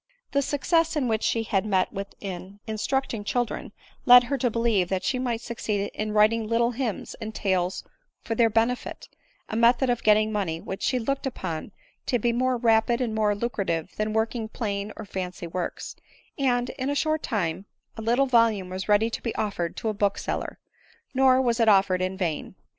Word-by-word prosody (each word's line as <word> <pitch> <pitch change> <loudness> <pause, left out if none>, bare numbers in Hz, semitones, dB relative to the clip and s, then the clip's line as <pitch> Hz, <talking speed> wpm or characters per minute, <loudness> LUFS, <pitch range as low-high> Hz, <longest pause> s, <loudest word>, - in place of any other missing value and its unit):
The 280 - +2
success 330 +4 +1
which 235 -7 0
she 230 - +1
had 195 -3 0
met 190 -3 +1
with 200 +1 -6
in 195 +1 -7
instructing 225 +1 -2
children, 240 +2 -2 0.4
led 245 0 +10
her 275 +3 -2
to* 245 - +2
believe 225 -6 +1
that 190 -1 -1
she 255 - 0
might 240 -3 -2
Succeed 210 -4 -3
in 215 0 -3
writing 215 +1 +3
little 235 +1 +2
hymns 240 -3 -3
and 220 0 -6
tales 185 -2 0 0.4
for 230 - -2
their 230 0 +4
benefit; 230 +3 -1 0.4
a - - -5
method 240 +3 +4
of 240 - -1
getting 215 0 +4
money 190 -6 -1
which 190 +3 -6
she 255 - +1
looked 270 +3 -2
upon 185 -7 -5 0.4
to 245 - +2
be 235 +1 0
more 255 +1 +1
ra 225 -2 +4
pid 235 +1 -1
and 240 -4 -1
more 210 -1 +2
lucrative 200 -7 -2
than 215 0 -1
working 220 +1 -1
plain 205 -3 -3
or 220 - -7
fancy 185 -2 -5
works; 170 +1 -4 0.4
and*, 245 -3 +1
in 260 +2 -1
a 285 - 0
short 310 +1 +1
time 195 -4 -2 0.3
a - - -6
little 240 +5 +2
volume 230 -7 +3
was 185 +2 -5
ready 215 +2 +4
to - - -4
be 230 - -3
offer 200 -5 -1
ed 170 - -6
to - - -3
a 215 - +1
bookseller; 200 -1 -2 0.6
nor 260 -1 +5
was 240 -3 +1
k 230 - +3
offered 195 -3 +4
in 185 +1 -2
vain. 170 -6 -3
220 Hz, 190 wpm, -26 LUFS, 200-245 Hz, 0.6 s, led